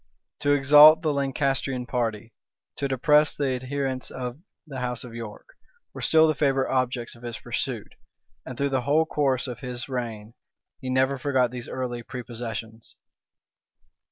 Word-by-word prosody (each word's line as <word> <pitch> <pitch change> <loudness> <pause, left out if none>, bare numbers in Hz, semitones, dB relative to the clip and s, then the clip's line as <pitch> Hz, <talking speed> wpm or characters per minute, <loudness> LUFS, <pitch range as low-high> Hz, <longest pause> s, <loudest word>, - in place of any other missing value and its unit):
To 145 - +2
exalt 150 +3 +8
the 155 -2 +1
Lancastrian 135 -2 -1
party, 115 -3 -3 0.4
to 140 - -1
depress 150 +3 +3
the 140 -2 0
adherents 130 0 -3
of 125 +1 -6 0.3
the 135 -4 -7
house 125 -1 -3
of 120 -2 -10
York, 115 - -8 0.4
were - - -8
still 160 0 +5
the 155 - +2
favorite 135 -2 +1
objects 125 -2 -1
of 120 - -17
his 120 -1 -6
pursuit; - - -4 0.5
and 130 - -8
through 140 0 0
the 135 -2 0
whole 150 +5 +2
course 135 -5 +1
of 125 -3 -6
his 125 -1 -5
reign, 115 -4 -5 0.5
he 130 - -6
never 130 +1 +1
forgot 130 -4 +1
these 125 -1 -7
early 125 -2 -4
prepossessions. 115 -2 -7
130 Hz, 155 wpm, -25 LUFS, 120-140 Hz, 0.5 s, exalt